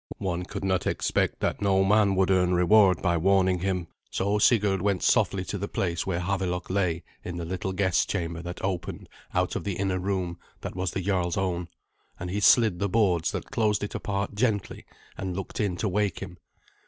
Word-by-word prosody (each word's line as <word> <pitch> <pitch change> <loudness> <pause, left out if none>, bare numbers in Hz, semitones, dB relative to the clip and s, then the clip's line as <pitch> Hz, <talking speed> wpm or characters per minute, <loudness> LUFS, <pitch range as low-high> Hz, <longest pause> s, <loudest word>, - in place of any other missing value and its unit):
One 90 -1 -2
could - - -6
not 95 -2 0
expect - - 0
that - - -1
no 95 -1 +3
man 100 0 +3
would 95 0 +2
earn 90 -1 +3
reward 95 0 +5
by 85 -2 +2
warning 95 +1 +3
him. 90 -1 -1 0.2
So 100 +2 0
Sigurd 105 -4 +3
went 100 -2 0
softly 95 -2 +2
to 100 - -4
the 100 - -3
place 85 -4 -2
where 90 -2 -1
Havelok 90 -1 -2
lay 90 -4 0 0.2
in 90 -1 -5
the 85 - -4
little 95 +2 -3
guest 95 -3 +1
chamber 85 -3 -2
that 90 +1 -7
opened 90 -3 -3 0.3
out - - +1
of - - -2
the 100 -2 -2
inner 95 -1 -1
room 90 -2 -2 0.2
that - - -6
was 95 0 -1
the 95 - -3
jarl's 90 -2 0
own, 90 -2 -1 0.5
and 90 - -4
he 100 - -1
slid 105 -3 +5
the 100 - 0
boards 90 -6 +2
that - - -6
closed 105 -3 +1
it 105 - -4
apart 100 0 -2
gently 105 -2 -1 0.3
and 95 -2 -3
looked 95 - -5
in 100 -4 0
to 110 - -1
wake 100 -1 0
him. 90 -2 -8
95 Hz, 200 wpm, -27 LUFS, 90-100 Hz, 0.5 s, reward